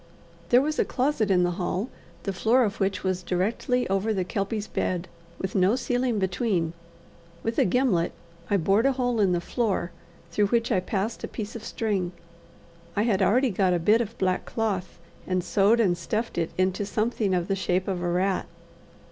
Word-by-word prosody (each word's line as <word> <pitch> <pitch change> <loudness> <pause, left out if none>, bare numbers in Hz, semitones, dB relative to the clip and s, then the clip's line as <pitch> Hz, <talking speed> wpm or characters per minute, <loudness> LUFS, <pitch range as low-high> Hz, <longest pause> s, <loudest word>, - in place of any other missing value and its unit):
There 245 +2 +6
was 305 +1 -1
a - - +5
closet 255 -5 0
in 180 -2 +4
the 175 - +1
hall, 185 +5 -1 0.4
the 195 - -2
floor 235 +7 +3
of 210 -1 -2
which 195 -1 0
was 185 -1 0
directly 210 +8 0
over 195 +3 0
the 185 - 0
Kelpie's 200 +3 -2
bed, 180 -4 -2 0.3
with 190 - -4
no 190 +4 +3
ceiling 245 -2 0
between. 185 -3 0 0.7
With 225 0 -1
a - - +5
gimlet 190 -6 +2 0.4
I 205 - +3
bored 195 +8 +3
a 275 - +3
hole 245 -3 0
in 195 -3 +4
the 175 - +2
floor, 195 -2 -1 0.4
through 205 +4 +2
which 230 +2 +1
I 195 - +3
passed 200 +4 -3
a - - -2
piece 215 0 -6
of 230 - -7
string. 195 -7 -2 0.8
I 205 - +2
had 210 -4 +1
already 245 +7 +3
got 185 -2 +2
a - - +2
bit 215 +7 +4
of 230 0 -5
black 185 -1 0
cloth, 205 -5 -2 0.3
and 185 -1 0
sewed 205 +5 +3
and 190 -6 +3
stuffed 215 +4 -2
it 165 - 0
into 185 +2 +1
something 215 -1 0
of 175 -1 -1
the 195 - +1
shape 185 -1 0
of 185 -3 -2
a 175 - -1
rat. 185 +2 0
200 Hz, 190 wpm, -26 LUFS, 185-230 Hz, 0.8 s, There